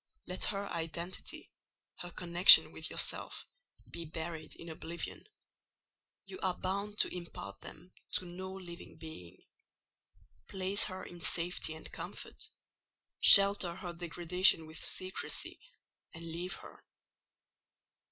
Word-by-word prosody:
Let 180 +1 -1
her 200 -1 -2
identity, 170 +2 -5 0.5
her 175 - -4
connection 175 +1 +8
with - - -4
yourself, - - -2 0.4
be 170 - -6
buried 160 0 -6
in 170 - -11
oblivion: 165 +1 -6 1.0
you 380 - -8
are 185 -1 0
bound 200 +3 -3
to - - -1
impart 100 - -8
them 180 - -12 0.2
to 185 - +1
no 185 +2 -7
living 180 -3 -9
being. 155 - -10 1.1
Place 195 +2 +1
her 185 -2 -6
in 175 -1 -11
safety 170 -1 0
and 160 - -12
comfort: - - -7 0.7
shelter 200 -3 +8
her 175 -2 -6
degradation 175 0 +3
with 155 0 -9
secrecy, 185 0 -3 0.6
and 165 0 -8
leave 170 +3 -4
her. - - -14
175 Hz, 115 wpm, -33 LUFS, 165-185 Hz, 1.1 s, connection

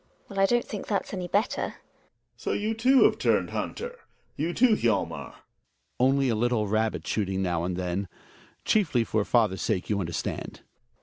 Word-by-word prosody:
GiNA. - - -38
Well, 195 -2 -4
I 195 - +6
don't 240 +3 +2
think 210 - -6
that's 200 -1 -2
any 180 -2 -3
better. 205 +7 0
Gregers. - - -3 0.6
So - - -3
you 215 +2 -1
too 255 +4 +5
have - - +3
turned - - +2
hunter; 480 +1 -4 0.4
you 160 +4 -1
too, 230 +4 +4
Hjalmar? - - -5
Hjalmar. 95 -8 -1 0.6
Only 135 +2 +3
a 120 - +2
little 115 -1 +1
rabbit 110 +2 0
shooting 95 -2 -1
now 85 -2 0
and 90 0 -2
again. 90 +2 -2 0.6
Chiefly 160 - +2
for 110 -1 0
father's 110 -4 +2
sake, 90 - -1
you 100 - +1
understand. 85 -3 -4
120 Hz, 180 wpm, -27 LUFS, -, 0.6 s, I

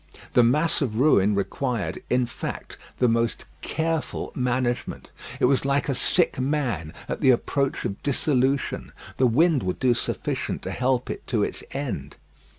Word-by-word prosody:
The 125 - +6
mass 150 +9 +2
of 115 -5 -1
ruin 105 -8 +4
required, 100 -1 -2
in 125 0 +2
fact, 115 - -6 0.2
the 125 - +3
most 115 0 0 0.2
careful 160 0 -2
management. 125 -1 -2 0.3
It - - +4
was 135 +1 +3
like 140 +1 +1
a - - +2
sick 125 - +2
man 130 - -1 0.2
at - - -4
the - - +5
approach 135 +2 +1
of 100 - -4
dissolution. 135 -1 0 0.2
The 130 - +4
wind 150 +4 +3
would 90 -1 -2
do 125 -2 +3
sufficient 120 - -3
to - - -4
help 125 0 0
it - - -8
to 110 -5 +1
its - - -3
end. 105 - -4
125 Hz, 155 wpm, -25 LUFS, 115-140 Hz, 0.3 s, The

